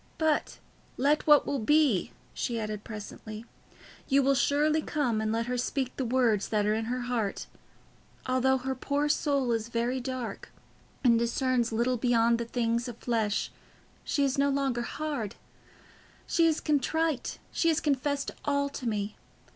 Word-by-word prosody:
"But 315 -2 0 0.4
let 290 +4 +2
what 295 -1 +7
will 280 - -1
be," 280 - +3 0.2
she 235 -2 -2
added 215 -1 -4
presently. 215 0 -8 0.6
"You 275 +1 +4
will 275 +1 +4
surely 295 +3 +2
come, 250 -9 0
and 215 0 -1
let 230 +1 0
her 250 0 -2
speak 255 +1 -2
the 265 - -2
words 230 -4 +2
that 210 -2 +1
are 210 - +2
in 220 +1 -1
her 250 +2 -2
heart. 240 -5 -2 0.8
Although 260 +1 +2
her 265 +1 -3
poor 285 +3 -1
soul 280 -4 +1
is 225 -1 -1
very 240 +2 -1
dark 250 -4 -5 0.5
and 235 -3 +5
discerns 240 0 +1
little 240 +3 +1
beyond 235 -1 +3
the 235 - -2
things 235 0 -1
of 240 -2 -7
the - - -19
flesh, 220 -4 0 0.5
she 285 - 0
is 275 0 +1
no 280 0 +3
longer 275 -3 0
hard. 280 -4 -4 0.9
She 335 -1 +3
is 315 -1 +1
contrite, 305 0 0
she 335 - 0
has 320 -1 +3
confessed 285 0 0
all 280 -1 +1
to 255 -3 -4
me. 210 -1 -3
250 Hz, 165 wpm, -29 LUFS, 230-280 Hz, 0.9 s, what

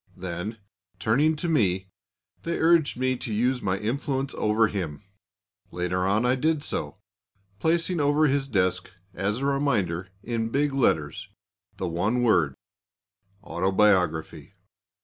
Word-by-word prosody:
Then, 90 +5 -5 0.4
turning 135 +11 +2
to 165 +3 -3
me, 95 - +1 0.5
they 170 0 -2
urged 165 -4 +3
me 130 0 +1
to 120 - -5
use 125 +4 +1
my 95 -1 0
influence 135 +5 -2
over 110 +1 +2
him. 90 -5 -4 0.7
Later 90 +1 -1
on 105 +5 +2
I 125 - +3
did 150 +3 0
so, - - -3 0.6
placing 170 - +1
over 145 +1 +3
his 140 -1 +1
desk 95 -7 0 0.2
as 100 +3 -1
a 135 - -3
reminder, 110 - 0 0.2
in 115 -1 -2
big 140 +3 0
letters, 80 - 0 0.5
the 95 - -2
one 100 +9 0
word 85 - +3 0.9
"Autobiography." 90 -3 +1
110 Hz, 130 wpm, -26 LUFS, 95-140 Hz, 0.9 s, urged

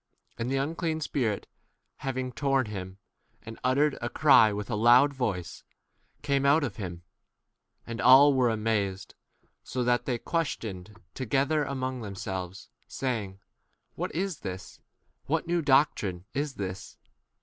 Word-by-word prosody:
And 115 +2 -2
the 135 - 0
unclean 160 +3 -1
spirit, 125 -9 -1 0.5
having 130 -1 -3
torn 135 +2 +1
him, 95 -3 -7 0.5
and 110 0 -9
uttered 140 +4 +2
a 120 - -2
cry 130 -7 +6
with 105 -1 -4
a - - 0
loud 120 +6 +5
voice, 100 -10 -3 0.6
came 140 -1 +1
out 140 +3 +4
2? - - 0
of 110 -7 -5
him. 90 -5 -6 0.8
And 115 -1 -5
all 140 +3 +8
were 130 -2 +3
amazed, 105 -4 -1 0.5
so 125 - -3
that 120 0 +1
they 125 -3 -1
questioned 110 - -4
together 140 +4 0
a 140 - -4
mong 130 -1 -3
themselves, 95 -1 -6 0.2
saying, 105 -7 -3 0.5
What - - -4
is 185 -2 -2
this? 95 -1 -7 0.5
what 160 +3 0
new 175 0 0
doctrine 130 - +2
is 145 0 -2
this 95 -1 -6
125 Hz, 140 wpm, -28 LUFS, 105-140 Hz, 0.8 s, all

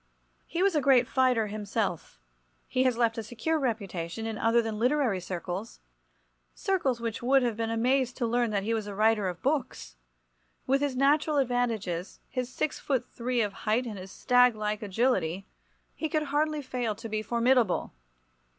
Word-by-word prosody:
He 350 +2 -1
was 395 -1 +3
a 300 - +3
great 260 -3 +4
fighter 255 -4 +2
himself. 205 -3 -3 0.5
He 255 +1 +1
has 250 -2 +2
left 230 -1 +1
a - - -4
secure 245 +9 -1
reputation 210 - -3
in 225 -1 -3
other 230 +2 +3
than 225 -2 -2
literary 250 -5 +2
circles—circles 225 - -5
which 230 -1 -4
would 265 +2 +4
have 235 -3 0
been 225 0 -2
amazed 250 +2 +1
to 245 - 0
learn 240 0 +1
that 200 -2 -1
he 225 +3 0
was 220 -2 -2
a 200 - -6
writer 215 -1 +3
of 175 - -8
books. 250 - -2 0.7
With 270 +2 +2
his 285 -3 0
natural 290 +3 +3
advantages, 230 -9 -1
his 255 -2 -3
six 305 - -2
foot 265 -4 -1
three 245 0 -1
of 205 -2 -1 0.2
height 235 +4 +2
and 215 -5 -6
his 185 +1 -9
staglike 220 -4 +2
agility, 195 -4 0 0.5
he 315 - -3
could 305 0 0
hardly 305 0 +1
fail 245 -4 -2
to 225 - -8
be 215 -1 -2
formidable. 235 -1 +1
235 Hz, 170 wpm, -28 LUFS, 215-260 Hz, 0.7 s, great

